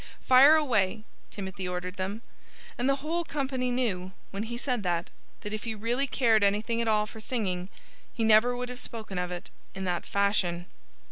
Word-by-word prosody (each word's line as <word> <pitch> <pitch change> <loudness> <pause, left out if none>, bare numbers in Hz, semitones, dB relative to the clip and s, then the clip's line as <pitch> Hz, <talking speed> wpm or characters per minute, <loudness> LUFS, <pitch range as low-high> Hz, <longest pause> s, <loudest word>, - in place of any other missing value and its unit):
"Fire 270 +4 +8
away!" 220 -9 +1 0.3
Timothy 190 -2 -5
ordered 180 +1 -4
them. 195 +5 -3 0.5
And 245 +3 0
the 275 +1 0
whole 340 +2 0
company 265 -5 -2
knew, 200 -7 -1 0.2
when 195 - -4
he 235 - -4
said 250 -2 -1
that, 175 -3 -1 0.3
that 210 - -5
if 215 - -4
he 225 -1 -2
really 240 +6 0
cared 230 -5 +3
anything 215 +4 +2
at 230 - -1
all 210 -1 +3
for 220 +1 -11
singing 195 -6 -2 0.4
he 230 - -2
never 220 +3 +5
would 250 0 -4
have 250 0 -7
spoken 215 -6 -6
of 180 0 -2
it 175 +1 -7 0.2
in 195 - -4
that 180 -2 -2
fashion. 195 -4 +1
215 Hz, 185 wpm, -28 LUFS, 190-245 Hz, 0.5 s, Fire